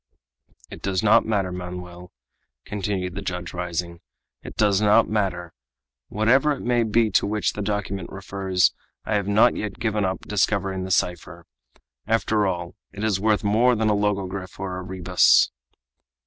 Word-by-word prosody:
"It - - -9
does 95 0 -1
not 110 +2 +4
matter, 100 -4 0
Manoel," 90 0 -8 0.5
continued 95 -3 -3
the 100 - -5
judge, 90 -2 -5
rising; 85 -1 -4 0.4
"it - - -10
does 105 -2 +2
not 110 +2 +4
matter! 90 -5 -2 0.5
Whatever 130 +8 +3
it 140 - -7
may 120 -1 +2
be 110 0 +2
to 95 - +2
which 105 +1 -1
the 105 - -5
document 100 -3 -3
refers, 95 -2 0 0.3
I - - -2
have 100 -2 0
not 105 +4 +4
yet 105 -2 -5
given 110 -2 -1
up 95 -1 -2
discovering 95 -2 -1
the - - -6
cipher. 90 -1 -1 0.6
After 110 -2 +1
all, 85 -2 -3 0.2
it 105 - -7
is 105 -4 +1
worth 105 +1 +1
more 115 +4 +3
than 110 -1 +1
a - - +2
logogryph 100 -2 -2
or 95 -1 -4
a - - -6
rebus!" 90 -1 +3
100 Hz, 160 wpm, -23 LUFS, 90-105 Hz, 0.6 s, not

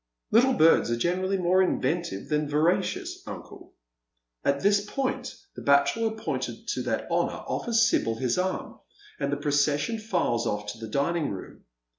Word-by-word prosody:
" - - -50
Little 250 +4 +5
birds 160 - +5
are 120 - +1
generally 185 +7 0
more 185 +1 +3
inventive 170 - -1
than 150 -1 0
veracious, 170 +6 0
uncle." - - -10 0.7
And 140 - +3
at 140 - -9
this 200 0 +4
point 260 +5 -3 0.2
the - - -7
bachelor 140 +11 +3
appointed 220 0 -4
to - - -1
that - - -2
honour - - 0
offers 230 -1 +2
Sibyl 115 - +1
his 120 +1 0
arm, 185 +1 -3 0.4
and 140 0 -1
the 145 - 0
procession 145 +7 +1
files 175 - 0
off 105 0 -2
to 110 - -12
the 110 - -6
dining 150 +5 0
room. 95 - -8
165 Hz, 165 wpm, -27 LUFS, 140-200 Hz, 0.7 s, Little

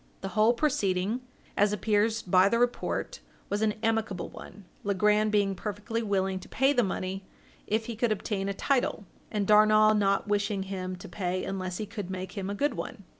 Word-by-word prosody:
The 195 - -4
whole 215 +4 +4
proceeding, 225 -5 0 0.3
as 205 0 +3
appears 215 +2 +1
by 185 +1 +4
the 230 - +2
report, 245 0 -1 0.3
was 205 +1 0
an 215 -1 +1
amicable 220 -4 -1
one, 205 - -12 0.2
Legrand 210 +2 +2
being 200 -2 +2
perfectly 210 +4 -4
willing 195 -3 0
to 185 - -13
pay 270 +2 +3
the 245 - +3
money, 190 -2 -3 0.4
if 220 +1 0
he 235 - -5
could 230 +1 +1
obtain 200 -1 -2
a - - -1
title, 250 -4 0 0.2
and 205 -2 -1
Darnall 215 +1 +6
not 200 -1 +2
wishing 205 -1 0
him 185 -1 -4
to 180 - -10
pay 180 0 -2
unless 185 -2 -3
he 215 - -3
could 205 -3 -6
make 185 0 -5
him 195 -2 -4
a 200 - -3
good 285 +5 +1
one. 200 - -6
205 Hz, 185 wpm, -28 LUFS, 195-220 Hz, 0.4 s, Darnall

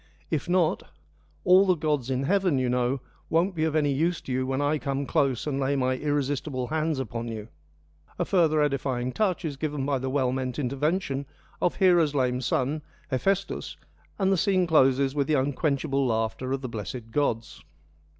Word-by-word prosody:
If 155 +2 -1
not, 180 -1 +2 0.3
' - - -36
All 185 +1 +6
the 185 - +4
gods 150 -5 -1
in 130 0 0
heaven, 185 -1 +2
you 130 -1 +1
know, 125 +1 0 0.3
won't 175 +4 +2
be 160 -2 0
of 160 -1 -1
any 145 -2 +2
use 165 +5 +1
to - - -7
you 130 0 0
when 135 0 -1
I 145 +1 +1
come 140 0 -2
close 130 -2 +1
and 140 -2 -1
lay 140 +1 +1
my 130 -1 +1
irresistible 145 -2 -1
hands 155 -1 0
upon 120 -2 -4
you.' 110 -1 -6 0.7
A 175 - 0
further 160 -5 +3
edifying 130 -3 -1
touch 185 +1 0
is 145 -3 -3
given 145 -2 -2
by 140 -2 0
the 130 +1 -3
well 130 -2 +1
meant 130 -1 -3
intervention 140 +1 -1 0.3
of 175 - +1
Hera's 175 -6 +4
lame 125 -2 +1
son, 135 +4 0 0.3
Hephaestus, 195 +9 -1 0.4
and 195 -1 +2
the 190 - +3
scene 185 0 +2
closes 135 -4 +3
with 140 -2 0
the 155 - +2
unquenchable 140 0 0
laughter 115 +3 -1
of 135 0 -1
the 130 - -4
blessed 115 +1 -6
gods. 115 -5 -1
140 Hz, 185 wpm, -26 LUFS, 130-160 Hz, 0.7 s, All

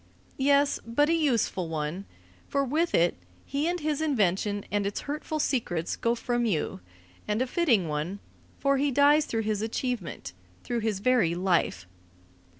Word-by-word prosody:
Yes, 280 +1 +3
but 290 +7 +1
a - - +4
useful 235 - +1
one, 160 +4 -3 0.4
for 280 -1 +1
with 320 +6 +1
it 170 +1 +3 0.3
he 285 +3 -1
and 355 +1 -1
his 305 -1 -1
invention 205 - +1
and 205 0 +1
its 200 - -3
hurtful 300 +2 -4
secrets 200 - -1
go 235 0 0
from 240 0 -1
you; 185 - -1 0.5
and 210 +1 0
a 255 - +2
fitting 250 - +2
one, 155 +6 -3 0.4
for 275 0 +2
he 285 +2 +2
dies 285 +3 +5
through 225 -1 -1
his 210 -1 -1
achievement, 220 - -3 0.3
through 240 - -2
his 215 -3 -2
very 220 -9 +3
life. 175 - +1
230 Hz, 155 wpm, -27 LUFS, 195-285 Hz, 0.5 s, dies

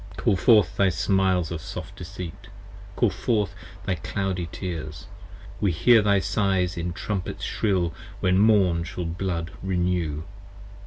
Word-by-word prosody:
Call 100 - +2
forth 105 -2 +4
thy 100 -1 +4
smiles 95 -1 +1
of 85 -2 -4
soft - - -7
deceit: 85 -3 -8 0.5
call - - +3
forth 105 -6 0 0.3
thy 95 - +1
cloudy 90 0 -3
tears: 80 -5 -5 0.5
55 - - -17
We 100 - +3
hear 115 +8 +6
thy 100 -1 +3
sighs 95 -2 +1
in 85 0 -3
trumpets 95 +1 -4
shrill 90 -6 0 0.3
when 95 0 +3
morn 100 -6 +4
shall 85 +1 -5
blood 85 -1 -3
renew. 90 -5 -1
90 Hz, 140 wpm, -25 LUFS, 85-100 Hz, 0.5 s, hear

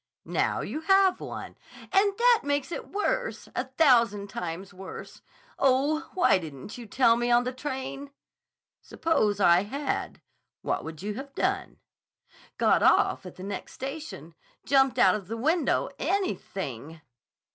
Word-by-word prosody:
"Now - - 0
you 305 - -4
have 385 +2 +4
one—" - - -7 0.4
"And 395 +1 +3
that 480 -1 +5
makes 285 +2 -1
it - - -6
worse! - - -2
A 250 - -1
thousand 235 -8 +3
times 180 +3 -5
worse. 190 +1 -10 0.4
Oh, 280 +4 +2
why 355 - +4
didn't 155 +1 -9
you 240 -2 -9
tell 230 +2 +4
me 240 +1 -1
on 240 0 +4
the 255 +1 -3
train?" 275 +1 -5 0.7
"Suppose 215 -11 0
I 175 -2 +5
had. 275 +8 -3 0.4
What - - -1
would 160 +1 -8
you 210 +1 -2
have 275 +4 -8
done?" 380 0 -1 0.8
"Got - - +3
off 190 - +3
at 180 - -11
the 185 - -10
next 200 0 -6
station. 270 - -7 0.3
Jumped 270 -2 +3
out 190 -6 +6
of 200 -4 -4
the 225 +3 -4
window. 310 +4 +1
Anything!" 165 - -3
255 Hz, 145 wpm, -27 LUFS, 200-315 Hz, 0.8 s, out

